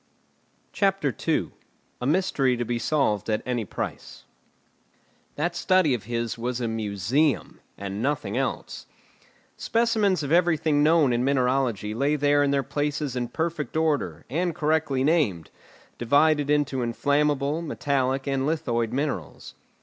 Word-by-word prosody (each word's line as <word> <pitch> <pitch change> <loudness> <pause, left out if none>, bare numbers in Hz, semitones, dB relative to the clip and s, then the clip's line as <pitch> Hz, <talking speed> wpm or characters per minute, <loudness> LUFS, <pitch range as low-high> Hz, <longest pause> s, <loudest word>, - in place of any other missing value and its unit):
CHAPTER 195 - +1
II. - - +1 0.5
A 125 - -1
MYSTERY 140 -6 +1
TO 120 - -2
BE 120 0 -2
SOLVED 115 -8 0
AT 110 0 0
ANY 120 -3 -2
PRICE - - -6 1.1
That 170 +4 -1
study 185 -6 +3
of 115 -5 -3
his 115 0 -3
was 125 +1 -2
a 120 - -1
museum, 110 +6 0 0.2
and 100 +1 -5
nothing 145 +4 -1
else. - - -3 0.7
Specimens 220 -6 +1
of 145 - -4
everything 160 -4 +3
known 150 -4 +4
in 120 +1 +1
mineralogy 125 -5 0
lay 140 +6 +1
there 145 0 +3
in 145 - +2
their 140 -1 +1
places 145 -2 -2
in 120 -1 -2
perfect 160 +1 -3
order, 145 - -1
and 170 +4 -1
correctly 150 -4 +1
named, 135 - +1 0.5
divided 145 +4 +3
into 145 -3 +1
inflammable, 145 +5 0
metallic, 135 -4 -1
and 135 -1 -1
lithoid 120 -8 -1
minerals. 130 - -4
140 Hz, 135 wpm, -25 LUFS, 120-155 Hz, 1.1 s, known